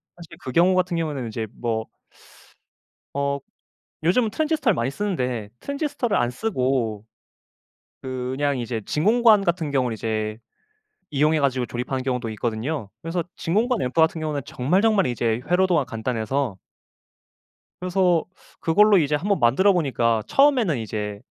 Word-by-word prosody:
사실 170 -2 -12
그 130 - -4
경우 175 +6 +4
같은 180 -1 +1
경우는 150 -7 -2
이제 110 0 -4
뭐 110 -2 -2 1.3
어. 140 0 0 0.7
요즘은 215 +8 +3
트랜지스터를 310 - +1
많이 120 +3 -1
쓰는데 125 - -2
트랜지스터를 280 -6 -1
안 120 - +1
쓰고 125 - -1 1.0
그냥 130 +2 -2
이제 115 -1 -3
진공관 215 +5 +4
같은 170 -5 -1
경우를 125 -4 +1
이제 110 0 -3 0.7
이용해 150 +2 +2
가지고 130 -3 +1
조립하는 125 +2 -3
경우도 125 -3 -2
있거든요. 115 +3 -3
그래서 165 +1 -2
진공관 220 +7 +1
앰프 125 - -2
같은 160 0 +3
경우에는 150 -2 -2
정말, 160 +11 +1
정말 215 - +3
이제 115 -2 0
회로도가 180 -5 +3
간단해서 115 0 -2 1.2
그래서 180 -2 +2 0.4
그걸로 205 +4 +5
이제 150 -2 +1
1 170 +8 -4
번 - - +1
만들어 160 +13 +4
보니까 120 -9 +1
처음에는 260 - +3
이제 105 -2 -4
140 Hz, 330 characters per minute, -23 LUFS, 120-185 Hz, 1.3 s, 그걸로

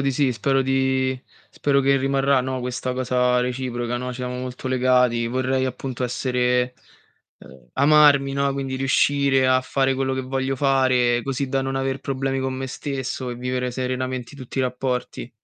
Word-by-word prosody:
di 135 0 +1
sì, 130 -1 +1
spero 135 +3 +1
di 130 -1 0 0.3
spero 140 -1 +1
che 135 0 +3
rimarrà, 135 0 +2
no, 130 0 -3
questa 125 +1 -3
cosa 125 -1 +1
reciproca, 125 -1 -2
no, 125 +1 -4
siamo 125 0 -5
molto 125 +1 -5
legati. 125 -2 +2
Vorrei 130 +2 0
appunto 130 -1 -4
essere 125 0 0 0.6
uhm, 65 -1 -16
amarmi, 140 -1 +5
no, 140 0 0
quindi 135 -1 -3
riuscire 135 0 +2
a 130 0 +4
fare 135 +1 0
quello 135 0 -1
che 130 - -2
voglio 135 +1 -2
fare 130 -3 +2
così 135 0 -2
da 135 0 0
non 135 0 -3
aver 135 0 -1
problemi 135 0 -2
con 130 0 -2
me 130 0 -4
stesso, 130 -2 -4
e - - -4
vivere 125 0 -2
serenamente 130 +1 -3
tutti 130 0 -7
i - - +3
rapporti. 125 -1 -3
130 Hz, 165 wpm, -23 LUFS, 125-135 Hz, 0.6 s, amarmi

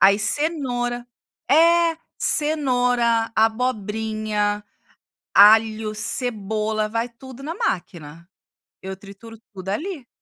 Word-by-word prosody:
Aí 200 +1 +6
cenoura 245 -3 0 0.4
é, 335 +2 +4 0.2
cenoura, 245 -6 +1
abobrinha, 215 -2 -1 0.7
alho, 215 +1 +5
cebola, 215 -1 -2
vai 230 +2 -2
tudo 260 +2 -13
na 320 +4 -5
máquina. 170 - -5 0.5
Eu 190 0 -6
trituro 205 +3 -13
tudo 190 -1 -10
ali. 300 - -4
225 Hz, 90 wpm, -22 LUFS, 210-255 Hz, 0.7 s, Aí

